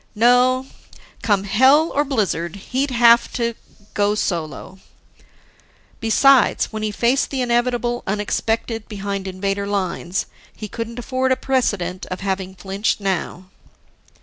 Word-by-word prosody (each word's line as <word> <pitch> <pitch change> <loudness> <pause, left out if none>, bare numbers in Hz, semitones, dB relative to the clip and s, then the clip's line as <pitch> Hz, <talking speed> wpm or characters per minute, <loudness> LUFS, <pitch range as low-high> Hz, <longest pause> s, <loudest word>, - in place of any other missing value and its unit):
No, 250 +3 +4 0.6
come 205 -3 +1
hell 265 +10 +4
or 290 - +2
blizzard, 200 - -1
he'd 260 +8 -2
have 235 -1 +5
to 235 -1 -1 0.4
go 205 0 +1
solo. 175 -1 -4 1.2
Besides, 250 +2 +3
when 215 - -4
he 215 - -1
faced 235 +6 +1
the 270 -2 -2
inevitable 240 0 0
unexpected 220 +2 -2
behind 200 -1 -4
Invader 195 +1 -2
lines, 190 -2 -2 0.3
he 215 - -7
couldn't 230 +2 -6
afford 260 +1 -1
a - - +4
precedent 205 -10 -1
of 185 - -6
having 190 -1 -3
flinched 195 +3 -2
now. 190 -2 -3
215 Hz, 120 wpm, -20 LUFS, 195-245 Hz, 1.2 s, have